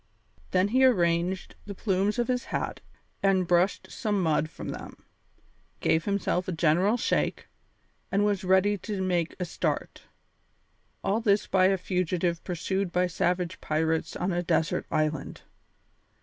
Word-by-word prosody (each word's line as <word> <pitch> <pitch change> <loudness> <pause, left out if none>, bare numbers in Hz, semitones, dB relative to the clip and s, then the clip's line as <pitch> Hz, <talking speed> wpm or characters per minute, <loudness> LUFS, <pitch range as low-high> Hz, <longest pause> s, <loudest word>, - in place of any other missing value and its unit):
Then 185 +2 +2
he 260 +4 +3
arranged 180 -6 +2
the 200 - -6
plumes 195 +2 0
of 240 - +1
his 250 -1 -1
hat - - -3 0.4
and 190 -2 +3
brushed 175 +3 +1
some 210 -4 -1
mud 155 -1 +1
from - - -8
them, - - -8 0.7
gave 160 +1 +1
himself 200 -2 0
a - - -1
general 175 +7 +2
shake, - - 0 0.7
and 200 +1 +2
was 205 -2 0
ready 190 +2 +3
to 205 +1 -4
make 180 -3 0
a 180 - -1
start. 170 - -3 1.0
All 215 +4 +1
this 205 -2 +2
by 185 -1 +4
a 195 0 +2
fugitive 180 -2 -1
pursued 190 +1 -2
by 180 +1 +2
savage 180 0 -1
pirates 160 +1 -1
on 180 +2 -1
a 175 - 0
desert 165 -2 0
island! 155 -2 -2
185 Hz, 145 wpm, -27 LUFS, 170-200 Hz, 1.0 s, by